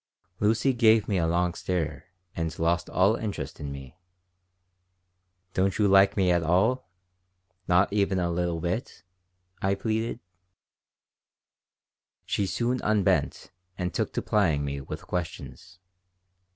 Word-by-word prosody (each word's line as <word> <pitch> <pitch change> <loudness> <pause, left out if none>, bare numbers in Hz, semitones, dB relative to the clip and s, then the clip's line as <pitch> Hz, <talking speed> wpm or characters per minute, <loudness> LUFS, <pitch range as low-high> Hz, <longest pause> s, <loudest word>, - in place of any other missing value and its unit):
Lucy 115 +6 +2
gave 115 -3 +4
me 100 -3 +1
a 80 - +1
long 85 +1 +1
stare 90 -3 -3 0.3
and 80 -1 -3
lost 85 +1 0
all 100 +4 +3
interest 110 -3 -5
in 70 -2 -5
me. 70 0 -9 1.6
"Don't 95 +1 +1
you 105 -1 +3
like 95 +1 +5
me 95 -2 +3
at 85 -1 +2
all? 95 +7 +1 0.8
Not 90 +3 +3
even 100 -2 +1
a 85 -1 0
little 85 -1 -1
bit?" 90 +3 -4 0.6
I 95 +1 +1
pleaded 110 +3 -2 2.1
She 100 - -1
soon 120 +5 -1
unbent 105 -3 +1 0.3
and 90 -1 -3
took - - -1
to - - -2
plying 80 -9 +1
me 70 0 -4
with 65 - -8
questions. 90 +1 -6
95 Hz, 125 wpm, -27 LUFS, 85-105 Hz, 2.1 s, like